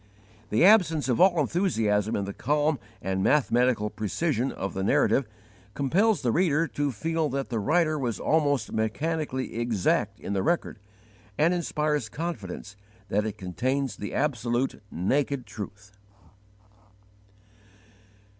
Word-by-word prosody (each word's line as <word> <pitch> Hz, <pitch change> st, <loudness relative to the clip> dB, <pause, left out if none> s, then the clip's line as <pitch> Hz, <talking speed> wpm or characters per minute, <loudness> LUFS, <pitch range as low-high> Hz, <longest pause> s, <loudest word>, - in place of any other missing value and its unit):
The 110 Hz, +11 st, +4 dB
absence 180 Hz, -8 st, +5 dB
of 125 Hz, -, +2 dB
all 180 Hz, -3 st, +5 dB
enthusiasm 115 Hz, -, +1 dB
in 100 Hz, -, -1 dB
the 100 Hz, -, -5 dB
calm 150 Hz, +3 st, +1 dB, 0.2 s
and 95 Hz, 0 st, -1 dB
mathematical 125 Hz, -6 st, +2 dB
precision 130 Hz, -, -1 dB
of 95 Hz, -, -5 dB
the 95 Hz, -, -3 dB
narrative 120 Hz, +6 st, +2 dB, 0.5 s
compels 190 Hz, +8 st, +2 dB
the 120 Hz, -, +2 dB
reader 165 Hz, +1 st, +2 dB
to 145 Hz, -1 st, -1 dB
feel 160 Hz, +6 st, -1 dB
that 135 Hz, 0 st, -3 dB
the 115 Hz, -2 st, -1 dB
writer 155 Hz, -, +2 dB
was 120 Hz, -5 st, -2 dB
almost 145 Hz, -7 st, +1 dB
mechanically 130 Hz, +3 st, -2 dB
exact 115 Hz, -6 st, 0 dB
in 100 Hz, -, -4 dB
the 95 Hz, -, 0 dB
record, 165 Hz, -, -1 dB, 0.6 s
and 165 Hz, +4 st, +3 dB
inspires 150 Hz, -7 st, -1 dB
confidence 110 Hz, -, -6 dB, 0.3 s
that 105 Hz, +2 st, +1 dB
it 105 Hz, -, -5 dB
contains 130 Hz, -, -2 dB
the 105 Hz, -, -5 dB
absolute, 125 Hz, -3 st, -1 dB
naked 130 Hz, -, -1 dB
truth. 105 Hz, -1 st, -9 dB
135 Hz, 125 wpm, -27 LUFS, 110-155 Hz, 0.6 s, absence